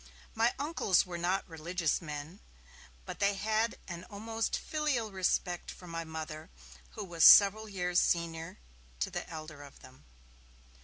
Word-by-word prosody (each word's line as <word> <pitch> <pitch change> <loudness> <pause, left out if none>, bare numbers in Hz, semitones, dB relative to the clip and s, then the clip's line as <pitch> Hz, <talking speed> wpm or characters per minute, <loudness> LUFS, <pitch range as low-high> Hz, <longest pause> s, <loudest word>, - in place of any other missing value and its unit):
My 230 +2 +2
uncles 285 - +2
were 175 -2 -6
not 180 +3 0
religious 165 0 -2
men, 150 +3 -7 0.7
but - - -7
they 200 0 +2
had 220 +3 0
an 175 -1 -7
almost 225 +3 -3
filial 290 -8 -2
respect 180 -2 -1
for 180 - -10
my 165 -1 -5
Mother, 160 -1 -7 0.4
who - - -5
was 170 -3 -1
several 210 +2 +8
years 180 -2 +1
senior 165 -1 -1 0.4
to - - -1
the - - -5
elder 155 -2 -8
of 140 -1 -14
them. 130 0 -16
180 Hz, 145 wpm, -31 LUFS, 165-210 Hz, 0.7 s, several